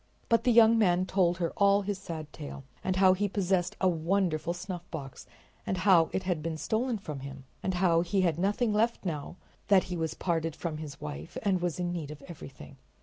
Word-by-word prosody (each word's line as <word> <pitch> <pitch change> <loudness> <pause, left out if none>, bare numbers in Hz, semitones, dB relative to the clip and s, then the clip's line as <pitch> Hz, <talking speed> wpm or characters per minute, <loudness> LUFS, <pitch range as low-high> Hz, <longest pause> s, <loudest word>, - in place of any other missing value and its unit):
But 230 0 +3
the 250 - +5
young 230 0 +6
man 185 -3 +3
told 180 -2 +2
her 170 -2 -2
all 200 0 +4
his 200 -1 -3
sad 155 -3 -7
tale, 145 -2 -8 0.2
and 185 0 0
how 185 0 +6
he 205 +2 0
possessed 185 -2 0
a 190 - +3
wonderful 170 -1 0
snuffbox, 175 -6 -7 0.4
and 190 - -2
how 180 -3 +5
it 190 - -2
had 180 -4 -1
been 160 0 -3
stolen 225 +7 -1
from 150 -8 -7
him, 135 0 -8 0.2
and 190 - -1
how 175 -2 +3
he 190 +3 0
had 170 -3 +1
nothing 210 +4 +1
left 225 0 +1
now 155 -1 -4 0.3
that 195 -2 +5
he - - -2
was 160 -1 -2
parted 165 -3 -1
from 165 -3 -4
his 150 -2 -8
wife 75 +1 -7
and 190 -3 +1
was 175 -1 -2
in 175 -1 -1
need 160 -5 -4
of 150 -1 -9
everything. 140 -4 -11
175 Hz, 205 wpm, -29 LUFS, 160-195 Hz, 0.4 s, young